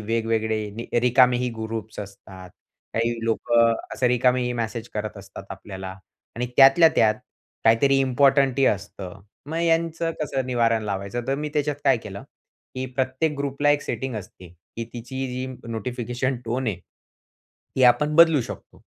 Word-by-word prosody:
वेगवेगळे 110 0 -1
रिकामे 125 0 +4
ही 125 0 -1
ग्रुप्स 110 -1 -6
असतात. 95 -2 -11 0.4
काही 115 +1 +1
लोकं 115 0 +3 0.2
असे 125 - +1
रिकामेही 125 0 +2
मेसेज 115 0 -4
करत 105 0 -4
असतात 100 0 -11
आपल्याला. 95 -2 -7 0.5
आणि 125 - -1
त्यातल्या 135 +5 +8
त्यात, 110 -1 +4 0.5
काहीतरी 135 +5 +4
इम्पोर्टंटही 135 0 +3
असतं. 100 -1 -3 0.3
मग 160 +3 -3
यांचं 165 0 +1
कसं 135 -3 -2
निवारण 115 -3 +1
लावायचं 100 +4 -4
तर 135 - +2
मी 150 +1 -3
त्याच्यात 150 -1 0
काय 135 -2 +5
केलं, 100 -3 -9 0.5
की 130 0 -3
प्रत्येक 130 +4 -1
ग्रुपला 140 +1 +1
एक 145 -1 +2
सेटिंग 130 -2 -4
असते, 95 -3 -10
की 90 +7 -9
तिची 130 +3 -5
जी 125 +1 -4 0.2
नोटिफिकेशन 120 +3 -3
टोन 120 +3 -2
आहे 105 -6 -2 1.0
ती 130 - +2
आपण 125 +5 +4
बदलू 165 -3 +7
शकतो. - - -10
120 Hz, 140 wpm, -24 LUFS, 110-135 Hz, 1.0 s, त्यातल्या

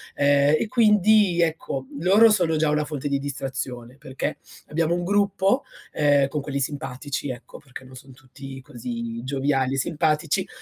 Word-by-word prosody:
Ehm 145 +1 +4
e - - -1
quindi 210 -5 +4
ecco 155 -5 -2
loro 200 +7 +6
sono 175 -6 +2
già 155 0 +2
una 150 0 +1
fonte 145 -2 -4
di 140 -1 0
distrazione 130 -3 -5
perché 135 +1 -4 0.3
abbiamo 165 +2 0
un 175 - -3
gruppo, 200 +5 +1 0.3
ehm, 145 -2 +3
con 150 +1 -3
quelli 140 0 -4
simpatici 140 0 -4
ecco, 125 0 -9
perché 135 -3 -12
non 130 0 -14
son 130 +2 -13
tutti 135 +1 -11
così 115 -1 -6
gioviali 135 0 0
e - - -3
simpatici 155 +5 0
145 Hz, 160 wpm, -24 LUFS, 135-170 Hz, 0.3 s, loro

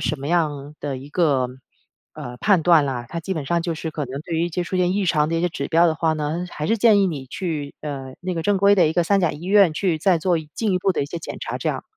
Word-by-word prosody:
什 130 +6 -1
么 140 - -6
样 150 -4 -1
的 140 -2 -3
一 135 +2 -10
个， 145 -7 +2 0.7
呃， 125 0 -7
判 195 -1 +3
断 165 -3 +5
啦。 130 -3 -3
它 170 +5 -4
基 190 +4 -4
本 155 -4 -4
上 170 +4 +1
就 170 -1 -2
是 160 +1 -4
可 150 -1 -3
能 135 +3 -6
对 170 0 -5
于 165 +1 +1
一 - - -4
些 175 +1 -2
出 185 - -3
现 180 0 +2
异 200 +1 0
常 150 -2 +2
的 165 - -1
一 - - 0
些 175 - +1
指 140 -4 -4
标 170 +1 +4
的 160 - +1
话 160 0 +1
呢， 155 +3 -3
还 150 - -4
是 225 - +2
建 215 -2 +5
议 195 - +3
你 145 -6 -4
去， 155 -2 -4
呃， 135 -3 -6
那 185 +1 -3
个 165 - -3
正 205 +3 +2
规 200 +1 +5
的 180 -5 +4
一 - - -1
个 175 - +2
三 200 +3 +2
甲 175 - +2
医 150 +1 -10
院 195 -2 +5
去 165 0 0
再 175 +1 +3
做 175 +1 +1
一 155 -1 -9
进 215 -3 0
一 180 - +2
步 195 - +2
的 - - -1
一 140 - -3
些 170 +3 -5
检 - - -7
查， - - -4
这 - - -2
样。 - - -2
165 Hz, 330 characters per minute, -22 LUFS, 150-180 Hz, 0.7 s, 断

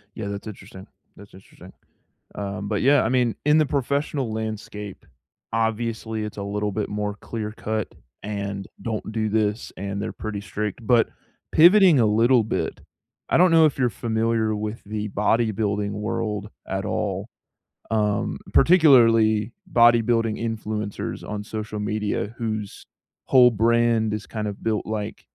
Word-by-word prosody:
Yeah, 105 - -5
that's 100 +1 -6
interesting. 95 -1 -10 0.3
That's 100 0 -15
interesting. 95 - -15 0.6
Um, 100 0 -5
but 105 -2 -1
yeah, 140 +1 +5
I - - 0
mean, 125 -2 +1
in 150 +1 +5
the 155 - +3
professional 140 -2 -1
landscape, 105 -2 -6 0.5
obviously, 110 -1 -1
it's 105 - -7
a 100 - -3
little 105 +1 -2
bit 105 +1 -2
more 105 0 -3
clear-cut 110 0 -4 0.3
and, 100 -1 -4
"Don't 110 -2 -4
do 110 -1 -1
this," 105 +1 -1
and 100 +1 -4
they're 110 - -3
pretty 110 -2 -5
strict, 105 +2 -5
but 120 -1 +4 0.4
pivoting 175 -3 +7
a 110 - +4
little 115 +3 +4
bit, 110 - -3 0.5
I - - +2
don't 180 +1 +5
know 165 -1 +6
if 145 - -1
you're 125 -2 +2
familiar 110 -1 0
with 105 +2 -5
the 105 0 -4
bodybuilding 105 -1 0
world 105 0 -3 0.2
at - - -3
all, - - -2 0.6
um, 105 -2 0 0.2
particularly 115 - +5 0.2
bodybuilding 115 -2 +3
influencers 110 -2 -4
on 105 0 -4
social 105 0 -5
media 105 0 -2
whose 110 -3 -4 0.4
whole 125 -2 +6
brand 115 0 +2
is 105 -1 -5
kind 105 -2 -4
of 100 -1 -7
built, 110 -2 -1
like, 105 -1 -4
110 Hz, 145 wpm, -23 LUFS, 105-115 Hz, 0.6 s, pivoting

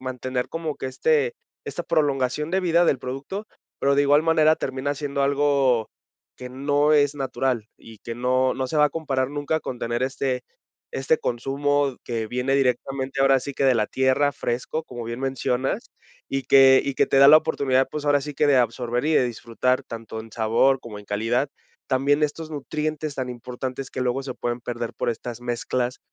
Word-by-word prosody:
mantener 130 -1 -3
como 165 -2 -4
que - - -5
este 470 - +1 0.3
esta - - -5
prolongación 145 -1 0
de 190 - +1
vida 175 -1 +3
del 135 - +2
producto, 140 +13 -6 0.3
pero, 140 0 +2
de 145 - +4
igual 145 +2 +4
manera, 155 -1 +4
termina 135 +2 -3
siendo 140 -1 -2
algo 140 -4 +2 0.5
que 125 - -8
no 145 +3 +1
es 145 -1 +3
natural 130 -4 -2
y 115 -2 -14
que 115 - -7
no 130 +1 +1
no 130 - -2
se 140 - -3
va 150 0 +6
a - - -6
comparar 135 -5 -1
nunca 145 +2 -1
con 125 - -6
tener 120 +1 -2
este 130 -1 -1 0.5
este 135 +4 +1
consumo 140 +2 0
que 115 -2 -3
viene 125 +3 0
directamente, 135 +1 0
ahora 135 -1 +5
sí 140 - -6
que, 135 - -1
de 130 -2 +5
la 110 -2 +1
tierra, 130 +2 +2
fresco, 125 +6 -3
como 120 -1 -8
bien 115 +2 -5
mencionas, 130 -1 -2 0.4
y 135 0 -2
que 135 0 +7
y 140 - -2
que - - +2
te 135 - +2
da 140 - +8
la 155 - +10
oportunidad, 135 -4 +1
pues, 150 -1 -5
ahora 145 -1 +3
sí 150 +1 -6
que, 150 - +2
de 140 - +5
absorber 120 0 0
y 160 - +1
de 130 - +4
disfrutar 120 +2 -1
tanto 115 -1 -7
en 110 0 -12
sabor 115 +4 +2
como 105 -3 -9
en - - -15
calidad, 115 +7 0 0.4
también 140 +3 +2
estos 155 +2 -5
nutrientes 150 +1 -3
tan 130 -1 -3
importantes 125 +2 -6
que - - -5
luego 125 +2 -1
se 130 - -5
pueden 120 0 -3
perder 120 -1 -4
por - - -2
estas 120 +1 -6
mezclas 120 +1 -2
135 Hz, 195 wpm, -24 LUFS, 125-145 Hz, 0.5 s, la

